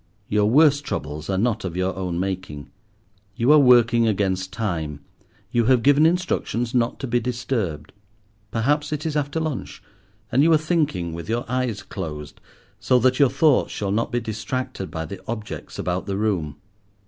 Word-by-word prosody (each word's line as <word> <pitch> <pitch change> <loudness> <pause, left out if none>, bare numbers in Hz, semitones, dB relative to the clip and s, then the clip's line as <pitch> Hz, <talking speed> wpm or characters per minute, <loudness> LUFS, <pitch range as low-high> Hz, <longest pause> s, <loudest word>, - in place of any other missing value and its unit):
Your 105 0 +2
worst 145 +2 +5
troubles 75 - -5
are 95 - 0
not 115 +1 0
of 90 -2 -4
your 95 0 -1
own 90 -3 -3
making. 95 -6 -4 0.6
You 120 +5 +3
are 155 - +7
working 120 -3 +5
against 95 -3 0
time; 80 -10 -3 0.5
you 120 -3 +2
have 125 -1 +3
given 145 +3 +5
instructions 165 -9 -1
not 120 -1 0
to - - -2
be 120 0 +1
disturbed. 115 - -3 0.6
Perhaps 145 +8 0
it 155 +1 -3
is 155 -2 -2
after 145 +1 -1
lunch, 155 -5 -4 0.5
and 130 - +3
you 165 +3 +5
are - - +6
thinking 150 - -1
with 85 0 -7
your 120 +2 -1
eyes 125 -3 -2
closed, 75 -2 -7 0.4
so 125 - +3
that 130 +1 +2
your 140 -3 +6
thoughts 145 +1 +3
shall 100 -2 -2
not 115 +3 0
be 120 - +1
distracted 110 -1 -4
by 80 -1 -4
the 95 +4 -8
objects 110 -2 -6
about 90 +2 -2
the 100 -1 -2
room. 90 -9 -1
115 Hz, 170 wpm, -23 LUFS, 95-130 Hz, 0.6 s, are